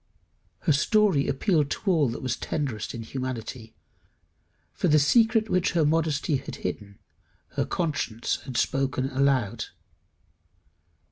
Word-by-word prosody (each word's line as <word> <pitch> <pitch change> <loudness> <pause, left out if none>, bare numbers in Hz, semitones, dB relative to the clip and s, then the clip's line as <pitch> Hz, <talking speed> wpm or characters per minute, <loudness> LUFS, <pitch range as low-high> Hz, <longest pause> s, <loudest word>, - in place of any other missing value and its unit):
Her - - +2
story 195 -1 +3
appealed 150 0 +1
to 195 - -1
all 155 -7 +3
that 115 - -6
was 130 -2 0
tenderest 130 -9 -3
in 115 - -5
humanity; 125 -2 -6 1.0
for - - 0
the 155 - +5
secret 225 - +4
which 185 -3 +1
her 165 -3 +3
modesty 155 -2 +1
had - - -7
hidden, 100 -1 -4 0.5
her - - -1
conscience 145 -9 -1
had 130 -3 -4
spoken 135 0 0
aloud. 130 -5 +1
140 Hz, 125 wpm, -26 LUFS, 125-160 Hz, 1.0 s, the